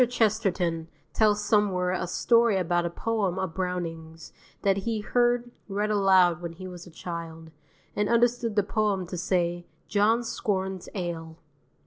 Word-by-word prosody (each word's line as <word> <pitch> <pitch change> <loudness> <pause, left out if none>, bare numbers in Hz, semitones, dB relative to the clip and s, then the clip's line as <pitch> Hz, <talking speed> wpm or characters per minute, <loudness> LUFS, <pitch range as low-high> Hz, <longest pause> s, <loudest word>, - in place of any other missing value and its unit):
Chesterton 195 -8 0 0.3
tells 210 -1 +3
somewhere 200 -4 +2
a 185 - -2
story 230 +3 +3
about 175 -1 +1
a - - -3
poem 200 0 -1
of 190 -3 -2
Browning's 165 -3 -5 0.3
that 195 -1 +3
he 220 +2 -2
heard 240 +2 +1 0.2
read 210 +1 -1
aloud 190 -4 +4
when 170 -1 -5
he 185 +2 -9
was 180 -1 -9
a - - -11
child, 165 -1 -7 0.4
and 210 0 0
understood 235 -1 +2
the 205 - +3
poem 205 -2 0
to 180 - -6
say 175 -1 -1 0.2
"John 220 +3 +2
scorns 190 -5 -2
ale." 165 -3 -4
190 Hz, 145 wpm, -27 LUFS, 175-210 Hz, 0.4 s, aloud